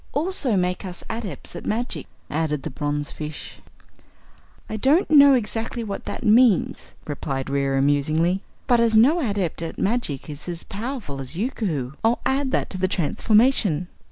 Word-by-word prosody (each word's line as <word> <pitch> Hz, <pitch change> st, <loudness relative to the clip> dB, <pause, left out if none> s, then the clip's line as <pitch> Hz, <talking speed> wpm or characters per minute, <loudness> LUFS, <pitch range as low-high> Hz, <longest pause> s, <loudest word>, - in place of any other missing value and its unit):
"Also 290 Hz, -, +2 dB
make 180 Hz, +1 st, -1 dB
us 180 Hz, -2 st, -6 dB
Adepts 220 Hz, -6 st, -6 dB
at -, -, -7 dB
Magic," 235 Hz, +3 st, -3 dB, 0.2 s
added 150 Hz, -2 st, -2 dB
the -, -, -5 dB
bronzefish. 145 Hz, +2 st, -5 dB, 1.1 s
"I -, -, -5 dB
don't 280 Hz, -, +2 dB
know 285 Hz, -2 st, +8 dB
exactly 225 Hz, 0 st, -2 dB
what 200 Hz, -3 st, -5 dB
that -, -, -5 dB
means," 225 Hz, -2 st, +3 dB
replied 135 Hz, -2 st, -4 dB
Reera 135 Hz, -1 st, +1 dB
musingly, 155 Hz, +6 st, +1 dB, 0.2 s
"but 240 Hz, -1 st, +3 dB
as 230 Hz, -1 st, +3 dB
no 280 Hz, +10 st, +5 dB
Adept 200 Hz, -, -1 dB
at 165 Hz, -, -5 dB
Magic 195 Hz, -, -1 dB
is 150 Hz, +3 st, -6 dB
as 170 Hz, -1 st, -5 dB
powerful 210 Hz, -, -5 dB
as 135 Hz, +5 st, -2 dB
Yookoohoo, 185 Hz, -, -2 dB
I'll 230 Hz, +2 st, +2 dB
add 270 Hz, 0 st, +1 dB
that -, -, -1 dB
to 185 Hz, -, -4 dB
the 185 Hz, -, +2 dB
transformation." 190 Hz, -, +2 dB
195 Hz, 155 wpm, -23 LUFS, 150-235 Hz, 1.1 s, know